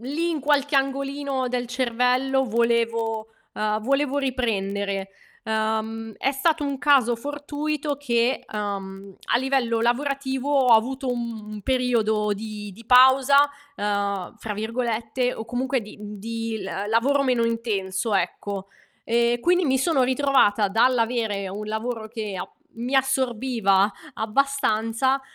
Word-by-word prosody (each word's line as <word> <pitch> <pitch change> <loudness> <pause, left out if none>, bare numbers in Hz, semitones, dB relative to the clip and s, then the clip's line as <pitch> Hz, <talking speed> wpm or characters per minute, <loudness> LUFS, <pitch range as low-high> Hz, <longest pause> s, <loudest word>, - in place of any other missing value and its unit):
lì, 300 +8 -2
in 310 -3 -2
qualche 290 0 +2
angolino 275 -1 -1
del 245 0 -2
cervello, 255 +2 +1
volevo 230 -1 0 0.3
uhm, 215 0 -1
volevo 275 +3 +1
riprendere. 200 -7 -1 0.4
Uhm, 220 0 -2
è 270 - 0
stato 300 +2 +1
un 280 -2 -2
caso 265 -5 +4
fortuito 290 +2 -3
che, 245 -2 0
uhm, 195 -2 -5 0.2
a - - +5
livello 255 -3 +1
lavorativo, 265 +2 -1
ho 265 -4 +4
avuto 260 +4 +1
un 220 -3 -5
periodo 220 -4 +1
di 210 0 -6
di 225 +5 -14
"pausa", 265 +3 +6 0.3
uhm, 200 -2 -2
fra 215 -2 -5
virgolette, 230 +2 -1
o 220 - -6
comunque 250 +3 -1
di 210 -1 -11
mhmm, 210 0 -8
di 225 +1 -4
l - - -6
uhm, 200 +2 -4
lavoro 265 +6 +2
meno 250 -3 +2
intenso, 220 -3 -1
ecco. 195 +1 -2 0.4
E 235 +1 +2
quindi 355 +5 +3
mi 265 -1 +2
sono 275 -1 +2
ritrovata 255 -6 +3
dall'avere 225 -2 +1
un 205 +3 -6
lavoro 220 +1 -3
che 215 -3 -5
ap 180 - -6 0.2
mi 245 +4 -1
assorbiva 240 -6 +2 0.2
abbastanza, 260 +1 +1
235 Hz, 130 wpm, -24 LUFS, 215-265 Hz, 0.4 s, pausa